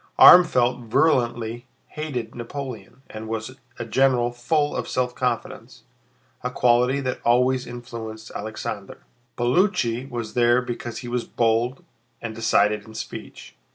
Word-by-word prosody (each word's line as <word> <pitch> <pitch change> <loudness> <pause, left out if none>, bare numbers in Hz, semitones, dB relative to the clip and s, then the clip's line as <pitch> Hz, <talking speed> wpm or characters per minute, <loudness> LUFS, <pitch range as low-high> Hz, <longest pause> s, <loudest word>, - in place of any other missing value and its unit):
Armfeldt 125 -9 +7
virulently 120 -3 +1 0.2
hated 130 -7 -5
Napoleon 125 -1 -7
and 110 0 -8
was 110 +3 -4 0.2
a 120 - -4
general 125 0 +2
full 145 +5 0
of - - -3
self 125 -1 -1
confidence, 125 -2 -4 0.6
a 125 - -2
quality 125 +2 +3
that 130 -1 -3
always 125 +2 +2
influenced 115 -2 -8
Alexander. 105 -1 -6 0.3
Paulucci 125 - +1
was 120 -3 -5
there 120 0 +4
because 120 -2 -5
he - - -6
was 120 0 -2
bold 115 +3 0 0.4
and 115 -1 -5
decided 105 -2 +2
in 110 - -12
speech. - - -8
120 Hz, 125 wpm, -23 LUFS, 115-125 Hz, 0.6 s, Armfeldt